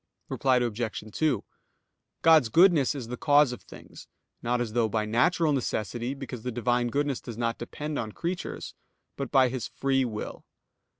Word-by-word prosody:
Reply 130 -2 +2
Obj. 120 -3 -2
2: 150 -9 +1 0.8
God's 160 -7 +6
goodness 165 - +5
is 125 -5 -6
the 125 - -4
cause 145 -3 +4
of 125 - -7
things, - - -13 0.3
not 120 +1 0
as 115 -3 -3
though 115 -2 +2
by 110 0 0
natural 145 - +2
necessity, 120 0 -2
because 135 -4 -7
the 125 - -3
Divine 120 +1 +1
goodness 140 +1 -1
does 115 -2 -8
not 115 -1 -1
depend 145 +5 -4
on 110 -2 -4
creatures; 175 - -4 0.4
but 140 - -4
by 135 -2 +5
His 125 -2 -4
free 135 -1 0
will. 110 -4 -5
125 Hz, 165 wpm, -27 LUFS, 115-145 Hz, 0.8 s, God's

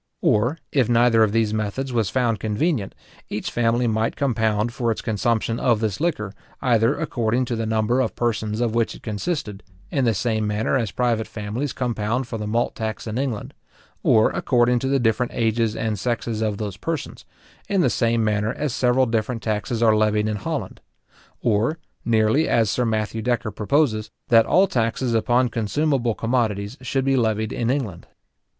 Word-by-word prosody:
Or, 120 +9 +2
if 130 -5 +2
neither 120 -1 +4
of 110 -2 +4
these 110 -1 +1
methods 110 +5 -2
was 115 -5 +1
found 115 -2 0
convenient, 110 - -1 0.3
each 105 - -4
family 120 +1 +1
might 110 0 0
compound 110 -4 0
for 120 -2 -1
its 110 - -3
consumption 115 +1 0
of 120 -4 +2
this 110 +3 -2
liquor, 105 - -1 0.3
either 115 -3 +2
according 125 -5 0
to 120 - -2
the 115 -1 -2
number 110 +3 +1
of - - -2
persons 110 -2 -1
of 115 -2 0
which 115 -1 0
it - - -14
consisted, 110 - -3 0.3
in 135 - +1
the 115 -3 +2
same 110 +1 0
manner 105 +5 0
as 115 -5 0
private 115 0 0
families 115 +6 -4
compound 120 0 -2
for 115 - -5
the 105 - -4
malt 115 +3 0
tax 110 -3 -4
in 110 +2 -3
England; 130 -6 -3 0.5
or 110 -1 +4
according 120 0 +2
to 130 - -2
the 135 +1 +2
different 120 0 0
ages 115 -1 +1
and 110 -3 -2
sexes 115 -1 -2
of 105 -2 -1
those 105 -2 -4
persons, 160 +5 -4 0.5
in 195 -2 +2
the - - +3
same 115 -1 +1
manner 105 0 +1
as 150 -4 -3
several 130 0 +3
different 115 0 -2
taxes 110 +2 -1
are 110 -1 +5
levied 105 0 +2
in 105 -1 -1
Holland; - - -4 0.6
or, 115 +7 +1 0.3
nearly 110 +6 +2
as 110 -3 +3
Sir 125 - 0
Matthew 110 0 -1
Decker 120 -2 -1
proposes, 110 0 +1 0.2
that 115 -2 +6
all 190 +2 +5
taxes 120 -4 -1
upon 120 +2 +2
consumable 120 +1 0
commodities 115 -3 -1
should 135 +1 -1
be 135 0 +3
levied 110 -3 0
in 120 -1 -1
England. 120 -10 -2
115 Hz, 180 wpm, -23 LUFS, 110-125 Hz, 0.6 s, that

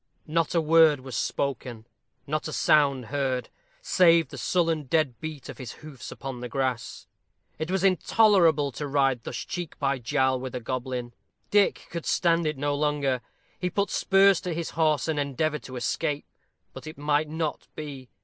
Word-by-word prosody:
Not 165 +2 0
a 165 - +4
word 160 -3 +5
was 130 -2 -7
spoken 120 -3 -3 0.4
not 155 +2 -2
a - - -5
sound 140 -4 +3
heard, 130 -3 -1 0.3
save 170 - +4
the - - -9
sullen 165 -4 +1
dead 145 -3 0
beat 155 -3 -6
of - - -9
his 125 -3 -7
hoofs 140 -5 -9
upon 135 -2 -6
the 125 0 -6
grass. 130 -2 -2 0.5
It 160 +2 -3
was 190 0 0
intolerable 185 -6 +4
to 145 +4 -5
ride 135 -4 +1
thus - - -6
cheek 175 -3 -5
by 140 -2 0
jowl 130 +2 +1
with 130 0 -6
a - - -2
goblin. 125 0 -4 0.4
Dick 205 -1 +3
could 170 -2 -5
stand 170 -2 +2
it 150 -2 -2
no 145 +1 0
longer. 145 -3 0 0.4
He 180 - -1
put 200 +3 -1
spurs 195 -1 +4
to 175 -3 -3
his 170 0 -3
horse, 155 -1 +1
and 155 -2 0
endeavored 145 +2 -1
to 130 - -8
escape. 145 +4 -2 0.5
But - - -10
it 155 - -8
might 150 +1 +1
not 160 -1 -3
be. 140 -5 -7
150 Hz, 175 wpm, -26 LUFS, 130-165 Hz, 0.5 s, word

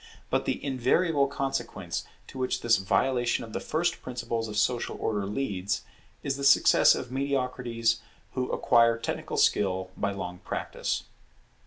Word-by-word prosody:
But - - +1
the - - -2
invariable 140 +3 +2
consequence 120 -10 -3 0.2
to 130 - -10
which 130 - -1
this 115 -1 +4
violation 120 +5 +1
of 110 -2 -10
the - - -2
first 175 +2 -1
principles 120 -2 -3
of 105 -1 -5
social 120 +3 0
order 105 -3 -1
leads, 100 -4 -2 0.4
is 135 -1 -1
the 140 - -5
success 140 0 +6
of 125 - -6
mediocrities 125 -4 0 0.3
who 125 -1 -2
acquire 115 -1 +4
technical 115 - -4
skill 95 -2 +2
by 100 -1 -1
long 90 -2 -5
practice. - - -3
120 Hz, 145 wpm, -28 LUFS, 105-135 Hz, 0.4 s, success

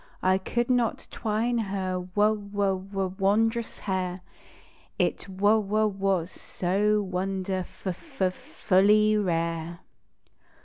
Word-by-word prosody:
I 185 +1 +3
could 240 +5 -1
not 240 -3 0
twine 230 +2 0
her 190 -3 -2
w 210 -1 +2
w 195 -2 0
w 190 -2 -2
wondrous 225 +4 +1
hair 185 -2 -2 0.8
It - - 0
w 210 +3 +4
w 215 +2 +1
was 195 -3 -1
so 205 +3 0
wonderf 185 0 -2 0.2
f 270 - -6
f 185 -1 +2
fully 210 +4 +3
rare. 170 -3 -1
195 Hz, 115 wpm, -27 LUFS, 185-215 Hz, 0.8 s, w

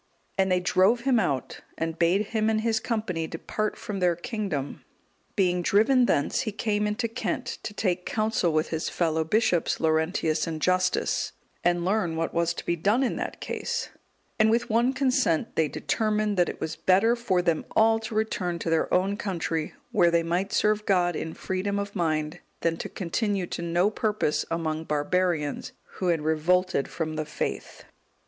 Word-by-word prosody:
And 190 -1 +2
they 180 - +4
drove 185 +6 +3
him 255 -2 +3
out 140 -10 -2 0.2
and 165 0 -3
bade 185 +5 +2
him 220 -1 +2
and 215 -1 +1
his 225 -1 +1
company 215 -9 -2
depart 210 +6 -3
from 205 -2 -5
their 180 -2 +3
kingdom. 175 - -4 0.5
Being 180 -3 +2
driven 240 +7 +4
thence, 145 - +1
he 235 -4 -1
came 210 0 0
into 210 +3 -1
Kent, 230 - -3
to - - -5
take 185 -4 -1
counsel 215 -5 0
with 155 +1 +1
his 160 -1 -2
fellow 160 -2 0
bishops, 180 0 +1
Laurentius 160 0 +1
and 160 -1 -3
Justus, 185 +2 +1 0.3
and 175 0 +2
learn 190 -4 +1
what 165 0 -2
was 170 0 +1
to - - -7
be 170 - +1
done 205 +10 +2
in 255 - 0
that - - -4
case; - - -3 0.5
and 215 0 +5
with 235 +1 +1
one 235 +3 +3
consent 255 - +1
they 160 - +2
determined 215 +4 0
that 175 -2 +2
it - - -7
was 160 - -3
better 200 +6 +3
for 195 -7 0
them 170 -3 +1
all 225 0 +5
to 220 0 -6
return 190 -5 -1
to 165 - -3
their 165 - +1
own 190 +2 +2
country, 165 -5 -2 0.2
where 175 - +4
they 170 0 +2
might 180 +4 -1
serve 210 0 +1
God 175 -3 +2
in 160 +1 -4
freedom 195 +2 -2
of 200 +1 -4
mind, 155 -2 -1 0.2
than 165 -1 +1
to - - -5
continue 195 +1 -1
to 170 - -5
no 175 +4 +2
purpose 210 -8 0
among 160 -1 -2
barbarians, 150 0 -1 0.3
who 185 - 0
had 165 -3 +1
revolted 160 0 +1
from 155 -2 -4
the 155 - -2
faith. 150 - -4
180 Hz, 180 wpm, -26 LUFS, 165-215 Hz, 0.5 s, and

